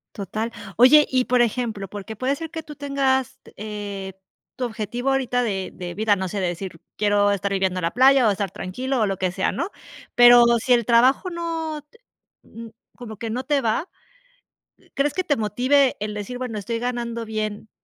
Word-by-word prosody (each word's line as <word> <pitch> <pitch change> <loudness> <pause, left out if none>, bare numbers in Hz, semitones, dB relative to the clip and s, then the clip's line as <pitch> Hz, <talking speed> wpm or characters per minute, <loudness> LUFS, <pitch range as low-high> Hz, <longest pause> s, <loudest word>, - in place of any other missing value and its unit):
Total. 215 +3 -4 0.2
Oye, 275 +6 +7
y 255 -1 +1
por 250 0 +3
ejemplo, 225 -4 -1
porque 205 +2 -8
puede 265 +4 0
ser 325 +1 -7
que 325 -2 -6
tú 300 - -10
tengas, 265 -2 -1
t - - -17
eh, 205 -2 -6 0.4
tu 255 - -1
objetivo 240 +3 -3
ahorita 255 -2 +1
de 195 -5 -2
de 175 -1 -7
vida, 210 0 +1
no 190 - -3
sé, 200 +2 -3
de 185 - 0
decir: 175 -1 -6 0.2
"Quiero 205 -1 +3
estar 200 0 -1
viviendo 190 -1 0
la 170 -1 -1
playa 260 +1 +5
o 210 - +4
estar 200 -2 -3
tranquilo 250 +9 -3
o 215 - +3
lo 195 - -1
que 185 -1 -1
sea", 190 +1 -1
¿no?, 340 - -3 0.5
pero, 240 0 +8 0.2
si 250 - +4
el 235 -3 +2
trabajo 255 +9 +3
no 325 -3 -4
te 460 - -23 0.4
mm, 230 +1 -11 0.3
como 230 -3 -8
que 225 +1 -5
no 255 +3 -3
te 290 -1 +1
va. 230 +10 -1 1.1
¿Crees 285 +1 +1
que 370 - -1
te 290 -6 0
motive 255 +6 +2
el 210 0 -4
decir: 210 +4 -5
"Bueno, 250 -4 -5
estoy 230 +3 -3
ganando 235 -1 -3
bien 215 -1 -4
235 Hz, 195 wpm, -23 LUFS, 205-260 Hz, 1.1 s, pero